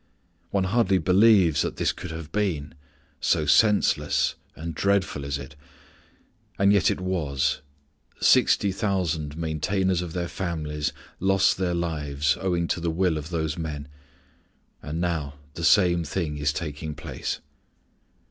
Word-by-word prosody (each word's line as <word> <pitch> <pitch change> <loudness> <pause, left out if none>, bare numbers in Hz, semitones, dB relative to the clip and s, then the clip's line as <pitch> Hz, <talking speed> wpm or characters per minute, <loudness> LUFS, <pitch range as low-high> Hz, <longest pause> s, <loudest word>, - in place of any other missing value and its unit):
One 100 -1 +1
hardly 95 -1 +2
believes 90 -3 +4
that - - -2
this - - +1
could - - -8
have 80 -1 -7
been, 85 -9 -1 0.5
so 75 - +1
senseless 105 +7 +3 0.2
and 80 +1 -5
dreadful 95 -5 0
is 70 0 -2
it, 70 0 -10 1.0
and 100 +1 +4
yet 100 - +4
it - - -1
was; 75 -6 -1 0.6
sixty 100 - +4
thousand 85 -7 -1
maintainers 85 +3 0
of 85 -2 -6
their 85 -1 -2
families 75 -5 -3 0.3
lost 95 +1 +3
their 90 -2 0
lives 75 -4 0
owing 90 -3 0
to 90 - 0
the 85 0 -1
will 85 0 +1
of 75 +1 -5
those 80 -1 -2
men. 75 -3 -5 0.9
And 80 +3 -5
now 80 -5 -2 0.2
the 85 - -6
same 85 +1 +4
thing 75 -2 -3
is 75 0 +1
taking 75 -1 -5
place. 75 -3 -5
85 Hz, 140 wpm, -25 LUFS, 75-95 Hz, 1.0 s, believes